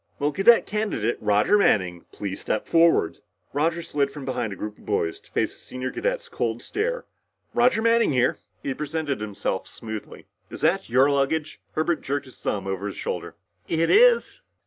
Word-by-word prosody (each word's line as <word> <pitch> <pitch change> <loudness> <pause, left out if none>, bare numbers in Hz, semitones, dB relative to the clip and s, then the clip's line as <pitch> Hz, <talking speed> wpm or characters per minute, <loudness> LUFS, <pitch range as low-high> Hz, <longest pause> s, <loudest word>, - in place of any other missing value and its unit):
"Will 145 +1 0
Cadet 195 +8 +5
Candidate 205 - -1
Roger 105 - +3
Manning 90 - +2
please 100 -2 -5
step 110 - -1
forward?" 165 0 +3 0.3
Roger 165 +4 0
slid 145 -4 0
from 140 -1 -8
behind 125 -4 -2
a - - -5
group 105 +3 -6
of - - -18
boys 85 -5 0
to - - -23
face - - 0
the - - -15
senior 130 0 -5
cadet's - - -2
cold - - -2
stare. - - -2 0.5
"Roger 240 -2 +3
Manning 230 -3 +4
here," 125 -2 +2 0.2
he 135 - -1
presented 150 -3 -3
himself 100 -2 -3
smoothly. 110 -2 -8 0.2
"Is - - -7
that 170 +2 +2
your 130 +4 +4
luggage?" 145 +3 0
Herbert 160 +1 0
jerked 140 +1 -2
his 130 - -15
thumb 100 -2 -2
over 95 +1 -3
his 100 - -6
shoulder. - - -4 0.3
"It 165 0 +1
is." 485 +2 +5
145 Hz, 175 wpm, -25 LUFS, -, 0.5 s, Cadet